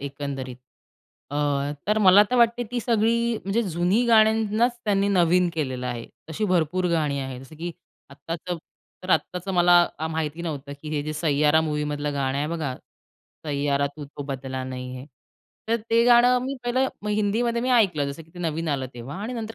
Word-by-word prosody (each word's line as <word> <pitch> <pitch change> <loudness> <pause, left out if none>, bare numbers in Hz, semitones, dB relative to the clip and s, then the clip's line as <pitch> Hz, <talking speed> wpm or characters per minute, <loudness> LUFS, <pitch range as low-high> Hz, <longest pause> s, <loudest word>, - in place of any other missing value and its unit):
एकंदरीत 140 -2 -5 0.7
अ, - - -6 0.5
तर 210 +1 +2
मला 200 -1 +7
तर 250 - +2
वाटते 235 0 +3
ती 245 - -2
सगळी 235 0 +1
म्हणजे 200 +4 +1
जुनी 180 +3 +1
गाण्यांनाच 220 +1 +3
त्यांनी 200 -1 +2
नवीन 180 -2 +3
केलेलं 130 -5 -2
आहे. 120 -2 -4 0.2
अशी 160 +7 -2
भरपूर 180 -1 +1
गाणी 150 -4 0
आहेत 130 -2 -6
जसं 135 +4 -13
की 170 +3 -4 0.4
आत्ताचं 165 +5 -5 0.5
तर, 185 - -5
आत्ताचं 180 +2 0
मला 175 0 +5 0.3
आ, 160 - -2
माहिती 160 +1 -3
नव्हतं 145 -4 -5
की 155 - -7
हे 145 - 0
जे 155 +1 -4
सय्यारा 150 0 +2
मूव्हीमधलं 150 -1 -2
गाणं 135 -1 -1
आहे 145 - 0
बघा, 155 -6 -3 0.7
सय्यारा 140 -1 0
तू 150 - -7
तो 145 0 -8
बदला 135 -1 -5
नही 125 0 -6
है. 130 - -8 0.6
तर 230 - +3
ते 230 +1 +4
गाणं 245 +1 +6
मी 270 +1 -3
पहिलं 255 +2 +1 0.2
हिंदीमध्ये 215 +3 0
मी 255 - 0
ऐकलं, 185 - +3
जसं 150 +4 -8
की 160 - -22
ते 175 - -10
नवीन 165 -1 -2
आलं 135 -3 -1
तेव्हा 125 +5 -7
आणि 230 - -4
नंतर 225 -2 -5
165 Hz, 180 wpm, -24 LUFS, 145-215 Hz, 0.7 s, मला